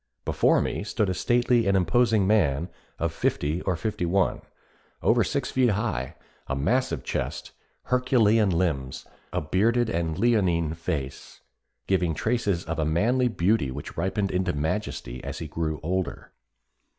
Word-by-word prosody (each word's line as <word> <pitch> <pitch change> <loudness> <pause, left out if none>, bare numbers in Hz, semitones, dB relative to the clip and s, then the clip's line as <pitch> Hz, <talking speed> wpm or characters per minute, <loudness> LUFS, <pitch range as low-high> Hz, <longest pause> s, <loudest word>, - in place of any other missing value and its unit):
Before - - +3
me - - -3
stood 105 -2 0
a - - 0
stately 120 +3 +2
and 100 0 +3
imposing 105 +3 +3
man 85 -6 +2 0.3
of 85 0 -1
fifty 80 +1 -1
or 95 - 0
fifty 105 +1 -3
one, 95 +1 +1 0.6
over - - +4
six - - -2
feet 130 -2 +3
high, 105 - -2 0.3
a 65 - -1
massive 125 - 0
chest, - - -4 0.3
herculean 115 -4 +3
limbs, 80 -7 -1 0.3
a 90 - -1
bearded 110 +9 +1
and 80 -1 -1
leonine 90 -9 +2
face, 75 -4 -5 0.4
giving 90 -4 +1
traces 105 -4 0
of 80 0 -3
a - - +2
manly 115 +12 +2
beauty 100 - +1
which 70 +3 -7
ripened 95 +3 -1
into 90 0 0
majesty 75 - -3
as - - -5
he 80 - -5
grew 80 0 -3
older. 90 -1 -3
95 Hz, 145 wpm, -26 LUFS, 80-110 Hz, 0.6 s, over